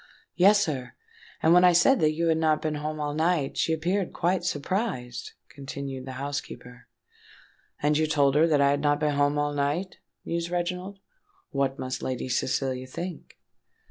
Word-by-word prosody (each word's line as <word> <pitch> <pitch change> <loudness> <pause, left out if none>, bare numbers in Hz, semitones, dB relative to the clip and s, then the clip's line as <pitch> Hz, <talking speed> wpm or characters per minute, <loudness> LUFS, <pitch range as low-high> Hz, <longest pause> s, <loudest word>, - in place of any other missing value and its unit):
"Yes, 200 +3 +6
sir; 140 -9 -2 0.5
and 160 - +5
when 180 +1 +6
I 180 -1 +6
said 260 +10 +5
that 155 0 +3
you 165 +2 -1
had 160 0 +2
not 155 -1 +2
been 155 -1 -2
home 150 +1 -4
all 145 -1 -2
night, 160 -2 0
she - - 0
appeared 175 +4 -1
quite 180 +2 0
surprised," 145 - -3
continued 135 -1 -7
the 130 - -6
housekeeper. 130 -3 -6 1.0
"And 150 +1 +3
you 155 +1 +2
told 145 -3 +3
her 155 +3 +4
that 150 -3 +3
I 140 0 +4
had 145 0 0
not 145 0 +2
been 150 -1 +1
home 145 +1 +2
all 145 0 0
night?" 145 +6 -2 0.3
mused 170 0 -2
Reginald. 180 +2 -3 0.5
"What 135 -1 0
must 130 0 -4
Lady 130 0 -3
Cecilia 130 0 -1
think?" 170 +6 -7
150 Hz, 175 wpm, -26 LUFS, 140-170 Hz, 1.0 s, Yes